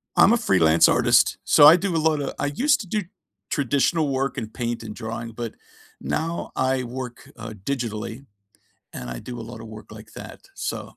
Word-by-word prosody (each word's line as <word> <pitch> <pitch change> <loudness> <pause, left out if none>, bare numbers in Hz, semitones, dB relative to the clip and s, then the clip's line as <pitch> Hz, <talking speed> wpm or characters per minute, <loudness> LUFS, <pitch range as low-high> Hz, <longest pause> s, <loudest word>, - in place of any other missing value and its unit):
I'm 210 - +6
a 235 - +4
freelance 80 - +4
artist, - - +4
so 145 - +7
I 165 - +9
do 180 -1 -2
a - - +3
lot 160 -1 +2
of 135 - -3
I 145 - -1
used 270 - +2
to 190 - -9
do 210 +2 -1 0.5
traditional 145 +2 +1
work 135 +1 -1
and 110 -1 -5
paint 120 -2 -3
and 105 -1 -7
drawing, 115 +1 -6
but 115 0 -6 0.5
now 165 +1 -3
I 130 0 +1
work, 125 0 -7
uh, 110 -1 -7
digitally 115 +2 -5 0.7
and 60 - -7
I - - -5
do 120 -1 -8
a - - -5
lot 115 0 -9
of 115 - -9
work 110 -1 -10
like - - -12
that, - - -11
so - - -5
125 Hz, 195 wpm, -23 LUFS, 110-150 Hz, 0.7 s, I